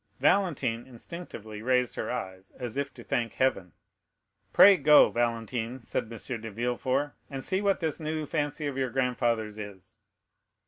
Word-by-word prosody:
Valentine 140 -12 +1
instinctively 115 -5 -8
raised 125 0 +2
her - - -4
eyes, 95 -5 -5
as 120 -3 -5
if 140 0 -2
to 120 - -12
thank 115 -1 -1
heaven. 95 -9 0 0.8
"Pray 200 0 +9
go, 150 -2 +6
Valentine," 120 +1 -1
said; 110 0 -3
M. 115 +1 -5
de 115 - -6
Villefort, 125 +6 -1 0.2
"and 135 -2 -5
see 190 +1 0
what 200 -2 +1
this 160 -1 -1
new 155 0 -2
fancy 145 0 -2
of 140 -2 -3
your 130 -1 0
grandfather's 120 -4 0
is." 100 -2 -10
125 Hz, 150 wpm, -28 LUFS, 115-145 Hz, 0.8 s, Pray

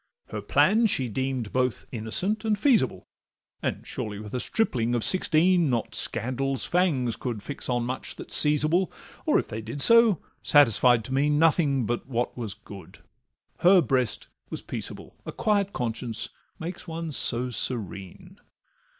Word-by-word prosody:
Her - - -5
plan 220 +4 +3
she 130 -10 0
deem'd 130 -1 -3
both 125 -2 -1
innocent 135 - -1
and 215 -2 +1
feasible, 220 - +2 0.6
And, - - -3
surely, 105 -1 -5
with 105 0 -9
a 125 - -1
stripling 120 - 0
of 120 - -1
sixteen 180 -2 +4
Not 120 -3 -2
scandal's 130 +2 +1
fangs 145 -10 0
could 115 -5 -5
fix 145 - -6
on 120 -1 0
much 130 +2 -4
that - - -10
's - - -4
seizable, 155 +4 +2 0.4
Or - - +4
if - - -1
they 110 - -6
did 115 +6 -7
so, 230 +1 +6 0.2
satisfied 125 -4 +4
to 130 - -5
mean 145 +2 +2
Nothing 150 -5 +2
but 120 +3 -3
what 120 -2 -2
was 110 -5 -4
good, 100 -2 -13 0.6
her 185 +2 +6
breast 130 -7 0 0.2
was - - -6
peaceable— - - -7
A - - -6
quiet 200 -2 0
conscience 115 - -4 0.3
makes 175 +3 -7
one 165 -1 -5
so 125 -2 -1
serene! 120 - -3
130 Hz, 155 wpm, -26 LUFS, 120-175 Hz, 0.6 s, so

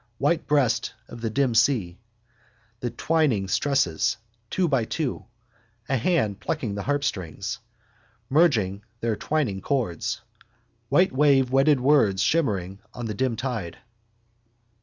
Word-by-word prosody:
White 150 +6 +1
breast 140 -6 +1
of 120 - -10
the 115 - -1
dim 130 +1 +1
sea. 110 -7 +2 0.8
The 125 -1 -2
twining 140 -11 +1
stresses, 125 - +1 0.3
two 185 -2 +1
by 135 -6 +2
two. 140 +4 -3 0.6
A 135 - +1
hand 120 - +1
plucking 115 -2 -3
the 100 - -4
harpstrings, 110 - -2 0.7
merging 115 - +2 0.2
their 115 -2 0
twining 125 -8 -1
chords. 115 - -2 0.7
Wavewhite 140 -5 +4
wedded 135 +1 +4
words 125 -9 +3
shimmering 100 - 0 0.2
on 120 - -5
the 110 - -3
dim 125 +2 0
tide. 115 -9 -4
125 Hz, 115 wpm, -25 LUFS, 100-145 Hz, 0.8 s, Wavewhite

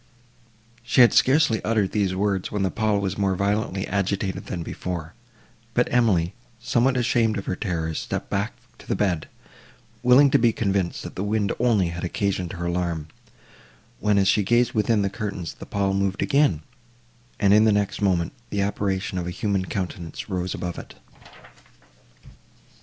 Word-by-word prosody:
She 120 +2 +3
had 120 - +7
scarcely 130 -5 +3
uttered 110 -3 +1
these 100 -3 0
words, 95 -1 -1
when 105 -1 -1
the 95 - 0
pall 110 -2 +1
was 100 0 -3
more 95 -1 +1
violently 100 0 -1
agitated 100 0 -2
than 85 -2 -4
before; 85 -1 -5 0.6
but 125 - +3
Emily, 100 -8 +2 0.3
somewhat 125 +2 +1
ashamed 115 -2 +2
of 100 - -5
her 95 - -2
terrors, 80 -5 -2
stepped - - -4
back - - -2 0.3
to - - -15
the - - 0
bed, 90 -6 -1 0.7
willing 130 +3 +6
to - - +4
be 115 -1 +3
convinced 100 -5 -1
that - - -7
the 95 - -4
wind 105 -1 0
only 110 -7 +2
had 85 +1 -6
occasioned 95 0 -2
her 85 -1 -5
alarm; 85 -3 -2 0.9
when, 105 -1 +2
as 95 -1 +3
she 105 - +4
gazed 120 +4 +2
within 110 -1 +2
the 100 - 0
curtains, 100 -7 -5
the - - -11
pall 100 -1 0
moved 95 -1 0
again, 135 - +2 0.8
and, 100 -1 +4
in 105 +1 +6
the 110 - +5
next 100 0 0
moment, 90 -2 +1 0.2
the 100 - -1
apparition 100 -1 -2
of 85 - -4
a - - -2
human 95 +1 -1
countenance 90 0 -5
rose 90 -1 -2
above 90 -1 -4
it. - - -11
100 Hz, 170 wpm, -24 LUFS, 90-110 Hz, 0.9 s, had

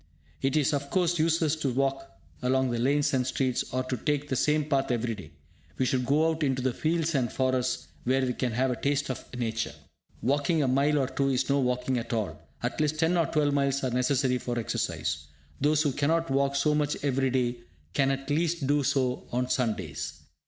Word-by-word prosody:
It 135 +3 +1
is, 150 +1 +2
of 140 0 -2
course, 175 -1 +1
useless 160 -1 +2
to 140 -4 -1
walk 135 +1 -1 0.3
along 130 0 +2
lanes 140 +5 +1
and 130 -1 +1
streets, 130 -1 0
or 130 +1 0
to 130 0 -2
take 145 +3 -1
the 130 - 0
same 150 +3 +2
path 135 -2 +1
every 120 -1 0
day. 95 -7 -9 0.5
We 130 - +1
should 125 -1 0
go 150 +4 +3
out 160 0 -1
into 130 -3 +1
the 130 -1 +1
fields 165 +2 0
and 125 -5 +1
forests 130 -1 0 0.2
where 130 +1 +2
we 125 - -1
can 125 -1 -1
have 130 +3 +1
a - - -1
taste 140 -1 0
of 130 - -6
Nature. 115 -2 -2 0.5
Walking 145 +4 +2
a - - +1
mile 140 +3 +3
or 135 -2 +1
two 135 +1 0
is 130 0 0
no 140 - +3
walking 125 0 0
at 115 - -5
all; 95 -9 -2 0.2
at 120 +5 -1
least 150 0 +1
ten 165 +3 +2
or 170 -2 +2
twelve 150 -2 +1
miles 140 -1 +1
are 130 - 0
necessary 125 0 +1
for 120 -1 -3
exercise. 80 -8 -2 0.3
Those 150 +2 +3
who 145 - +1
cannot 160 +3 +1
walk 140 +1 +2
so 150 +2 +2
much 150 -1 0
every 135 -1 +1
day 125 -1 0 0.4
can 135 +5 +2
at 135 +1 -2
least 165 0 +1
do 145 +2 +2
so 130 -2 0
on 125 +1 -1
Sundays. 105 - -2
135 Hz, 210 wpm, -28 LUFS, 125-145 Hz, 0.5 s, go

